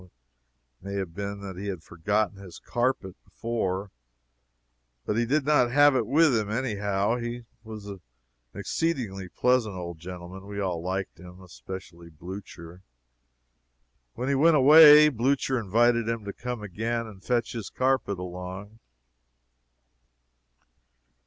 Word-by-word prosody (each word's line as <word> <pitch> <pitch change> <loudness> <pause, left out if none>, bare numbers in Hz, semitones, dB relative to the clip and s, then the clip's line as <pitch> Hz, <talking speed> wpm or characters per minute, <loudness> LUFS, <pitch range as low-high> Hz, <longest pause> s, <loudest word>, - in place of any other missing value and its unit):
It 90 - -18 0.7
may 100 0 -5
have 95 -4 -4
been 100 +2 -5
that 95 -2 -7
he 100 - -5
had 90 -5 -5
forgotten 100 +6 -1
his 95 -4 -11
carpet, 120 -6 -2
before, 100 -4 -3 1.1
but 105 - -1
he 120 +1 +1
did 145 +2 +1
not 145 -5 +3
have 145 +2 +5
it 120 -4 0
with 150 +1 +4
him, 105 -2 -1
anyhow. 105 -2 -1
He 120 0 -5 0.2
was 110 -2 -9
an 100 -3 -8 0.5
exceedingly 110 - -2
pleasant 125 -4 +1
old 85 -2 -7
gentleman; 90 +2 -9
we 100 0 -6
all 90 -4 -2
liked 95 0 -4
him, 90 +1 -13
especially 90 -1 -10
Blucher. 85 +1 -10 1.3
When 125 - -3
he 140 - +2
went 155 +4 +4
away, 150 +1 +9
Blucher 130 0 0
invited 115 +2 +2
him 115 -2 -3
to 100 - -5
come 125 -3 -5
again 115 +4 -3
and 100 -4 -13
fetch 120 -2 0
his 115 -4 -5
carpet 130 -6 0
along. 90 +4 -8
105 Hz, 135 wpm, -26 LUFS, 95-120 Hz, 1.3 s, away